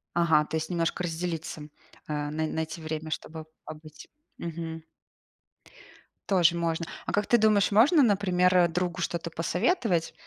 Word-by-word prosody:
Ага, 160 Hz, -3 st, +3 dB
то 160 Hz, -, -3 dB
есть 160 Hz, 0 st, -4 dB
немножко 170 Hz, 0 st, -1 dB
разделиться. 165 Hz, -3 st, -4 dB, 0.4 s
А 150 Hz, -1 st, -3 dB
най 155 Hz, +1 st, -1 dB
найти 160 Hz, +1 st, -4 dB
время, 155 Hz, 0 st, -5 dB
чтобы 160 Hz, 0 st, -6 dB, 0.2 s
побыть. 155 Hz, 0 st, -11 dB, 0.3 s
Мгм. 165 Hz, -1 st, -6 dB, 1.5 s
Тоже 175 Hz, -4 st, +4 dB
можно. 170 Hz, -1 st, -1 dB, 0.2 s
А -, -, -1 dB
как 205 Hz, 0 st, 0 dB
ты 240 Hz, -, +3 dB
думаешь, 210 Hz, -2 st, +3 dB
можно, 275 Hz, -, +5 dB
например, 185 Hz, -4 st, +3 dB
другу 180 Hz, +1 st, -2 dB
что-то 170 Hz, 0 st, -3 dB
посоветовать? 180 Hz, -, 0 dB
170 Hz, 135 wpm, -27 LUFS, 160-180 Hz, 1.5 s, можно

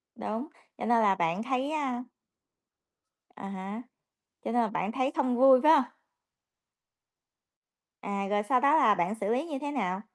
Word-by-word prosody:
Đúng, 225 Hz, +7 st, -5 dB, 0.3 s
cho -, -, -5 dB
nên 235 Hz, 0 st, +3 dB
là 200 Hz, -2 st, +3 dB
bạn 170 Hz, +3 st, -1 dB
thấy, 265 Hz, +3 st, -2 dB
a 265 Hz, -6 st, -2 dB, 1.3 s
À 195 Hz, -, -8 dB
há. 195 Hz, +3 st, -6 dB, 0.6 s
Cho -, -, -4 dB
nên 240 Hz, +1 st, +2 dB
là 225 Hz, -, +1 dB
bạn 205 Hz, -2 st, -3 dB
thấy 260 Hz, +3 st, -1 dB
không 260 Hz, -5 st, 0 dB
vui, 260 Hz, +1 st, +6 dB
phải 305 Hz, -, +7 dB
hông? 305 Hz, -4 st, +5 dB, 2.2 s
À, 200 Hz, -1 st, -3 dB
rồi 205 Hz, 0 st, 0 dB
sau 250 Hz, +4 st, +2 dB
đó 280 Hz, +4 st, +4 dB
là 220 Hz, -10 st, +4 dB
bạn 180 Hz, +4 st, -1 dB
xử 200 Hz, -2 st, -4 dB
lý 265 Hz, +5 st, -1 dB
như 290 Hz, -5 st, -5 dB
thế 290 Hz, -1 st, -4 dB
nào? 190 Hz, -8 st, -2 dB
235 Hz, 170 wpm, -28 LUFS, 200-270 Hz, 2.2 s, phải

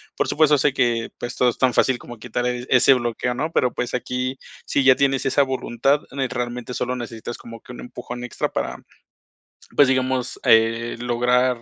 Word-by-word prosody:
Por -, -, 0 dB
supuesto, 150 Hz, -1 st, +4 dB
sé 140 Hz, 0 st, +2 dB
que, 120 Hz, -4 st, 0 dB
pues, 120 Hz, +1 st, -5 dB
todo 125 Hz, -, +3 dB
es 120 Hz, -, -4 dB
tan 130 Hz, -2 st, +2 dB
fácil 130 Hz, +1 st, +3 dB
como 120 Hz, 0 st, -11 dB
quitar, 120 Hz, +2 st, -3 dB
eh, 125 Hz, 0 st, -3 dB
ese 130 Hz, +1 st, +6 dB
bloqueo, 120 Hz, 0 st, -1 dB
¿no? 150 Hz, +6 st, -3 dB
Pero, 125 Hz, -6 st, +1 dB
pues, 125 Hz, 0 st, -3 dB
aquí, 125 Hz, +1 st, -2 dB, 0.3 s
si 140 Hz, -, +1 dB
ya 130 Hz, -1 st, +7 dB
tienes 135 Hz, -1 st, +1 dB
esa 135 Hz, +1 st, +3 dB
voluntad, 130 Hz, +1 st, 0 dB
ne 135 Hz, -1 st, -1 dB
realmente 125 Hz, 0 st, -4 dB
solo 125 Hz, +1 st, -2 dB
necesitas 120 Hz, -1 st, -6 dB
como 115 Hz, -1 st, -11 dB
que -, -, -11 dB
un -, -, -9 dB
empujón 125 Hz, 0 st, -8 dB
extra 125 Hz, -, -3 dB
para, -, -, -2 dB, 1.0 s
pues, 145 Hz, -, +6 dB
digamos, 130 Hz, -1 st, 0 dB
eh, 115 Hz, +1 st, +3 dB
lograr, 125 Hz, +1 st, +1 dB
125 Hz, 190 wpm, -22 LUFS, 120-130 Hz, 1.0 s, ya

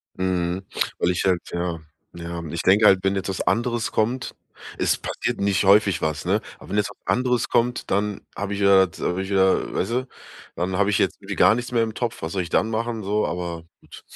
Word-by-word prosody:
Mhm, 90 Hz, 0 st, -1 dB, 0.4 s
weil 90 Hz, -, +2 dB
ich 90 Hz, -, -1 dB
halt 90 Hz, -2 st, +2 dB
Ja, 85 Hz, -1 st, -2 dB, 0.4 s
ja. 85 Hz, 0 st, -6 dB
Ich 85 Hz, -, -3 dB
denke 100 Hz, +4 st, +4 dB
halt, 95 Hz, -2 st, +7 dB
wenn 95 Hz, 0 st, +1 dB
jetzt 95 Hz, 0 st, -3 dB
was 95 Hz, -, -2 dB
anderes 120 Hz, -1 st, 0 dB
kommt 120 Hz, +3 st, -1 dB, 0.4 s
es -, -, +2 dB
passiert -, -, -3 dB
nicht 100 Hz, 0 st, +1 dB
häufig 100 Hz, -2 st, +4 dB
was, 80 Hz, +1 st, -2 dB
ne? 100 Hz, +4 st, +1 dB, 0.2 s
Aber -, -, -14 dB
wenn 105 Hz, -, -1 dB
jetzt 105 Hz, -, +1 dB
was 100 Hz, -, -14 dB
anderes 125 Hz, -2 st, +1 dB
kommt, 120 Hz, +1 st, 0 dB
dann 105 Hz, +1 st, 0 dB
habe 100 Hz, 0 st, -3 dB
ich -, -, -5 dB
ja 100 Hz, -1 st, +6 dB
jetzt 80 Hz, -3 st, -12 dB
habe 90 Hz, +2 st, -1 dB
ich 95 Hz, -, -5 dB
ja 95 Hz, -1 st, +2 dB
weißt -, -, -2 dB
du? 130 Hz, +2 st, -1 dB, 0.5 s
Dann 90 Hz, +1 st, -2 dB
habe 100 Hz, 0 st, +2 dB
ich 100 Hz, -, +2 dB
jetzt -, -, +1 dB
irgendwie -, -, -6 dB
gar -, -, +6 dB
nichts 125 Hz, +1 st, -4 dB
mehr 115 Hz, -2 st, +2 dB
im 110 Hz, -1 st, -3 dB
Topf. 115 Hz, -8 st, -4 dB
Was 80 Hz, -, -3 dB
soll 95 Hz, -2 st, -1 dB
ich 85 Hz, -, -6 dB
dann 110 Hz, -, +1 dB
machen? 115 Hz, 0 st, -2 dB
So, 105 Hz, +2 st, 0 dB
aber, 85 Hz, -2 st, -4 dB, 0.2 s
gut. -, -, -14 dB
100 Hz, 230 wpm, -23 LUFS, 90-110 Hz, 0.5 s, halt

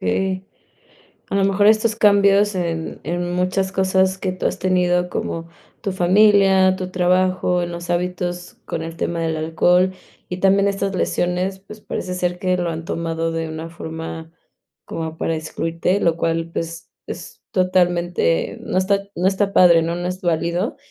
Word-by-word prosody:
Sí. 185 Hz, -, -1 dB, 0.8 s
A -, -, -2 dB
lo 195 Hz, -, +3 dB
mejor, 200 Hz, +1 st, +3 dB
estos 220 Hz, 0 st, +3 dB
cambios 200 Hz, -1 st, +4 dB
en 165 Hz, -2 st, -3 dB
en 175 Hz, +1 st, -2 dB
muchas 185 Hz, +1 st, 0 dB
cosas 190 Hz, 0 st, +2 dB
que 185 Hz, -1 st, -2 dB
tú 185 Hz, -, -5 dB
has -, -, -3 dB
tenido, 180 Hz, -1 st, +1 dB
como 165 Hz, -1 st, -4 dB, 0.3 s
tu 195 Hz, -, -2 dB
familia, 190 Hz, 0 st, +4 dB
tu 185 Hz, -1 st, -5 dB
trabajo, 180 Hz, 0 st, +2 dB
en 175 Hz, 0 st, -3 dB
los 170 Hz, 0 st, -7 dB
hábitos 175 Hz, 0 st, -2 dB
con 165 Hz, -, -4 dB
el 165 Hz, 0 st, -6 dB
tema 170 Hz, -1 st, -2 dB
del 160 Hz, -1 st, -1 dB
alcohol, 180 Hz, +4 st, +2 dB, 0.4 s
y 180 Hz, -, -3 dB
también 195 Hz, +1 st, +3 dB
estas 195 Hz, -1 st, -1 dB
lesiones, 180 Hz, +2 st, -1 dB
pues, 210 Hz, +2 st, -13 dB
parece 180 Hz, -, -4 dB
ser 180 Hz, 0 st, -1 dB
que 185 Hz, -1 st, +1 dB
lo 175 Hz, -1 st, -1 dB
han 165 Hz, 0 st, -5 dB
tomado 165 Hz, -1 st, -2 dB
de 165 Hz, 0 st, -2 dB
una 160 Hz, +1 st, -6 dB
forma 160 Hz, -1 st, -7 dB, 0.5 s
como 160 Hz, 0 st, -5 dB
para 165 Hz, -, -1 dB
excluirte, 165 Hz, +4 st, -1 dB
lo 170 Hz, -1 st, +2 dB
cual, 165 Hz, 0 st, -1 dB
pues, 165 Hz, 0 st, -5 dB, 0.2 s
es -, -, -8 dB
es -, -, -52 dB
totalmente 175 Hz, -, +1 dB
no -, -, -3 dB
está 200 Hz, +1 st, +2 dB
no 180 Hz, +2 st, +1 dB
está 200 Hz, +1 st, 0 dB
padre, 170 Hz, -2 st, +6 dB
¿no?, 170 Hz, +1 st, -2 dB
no 175 Hz, 0 st, -3 dB
es 185 Hz, +2 st, -5 dB
válido, 175 Hz, -, -1 dB
180 Hz, 170 wpm, -20 LUFS, 165-190 Hz, 0.8 s, padre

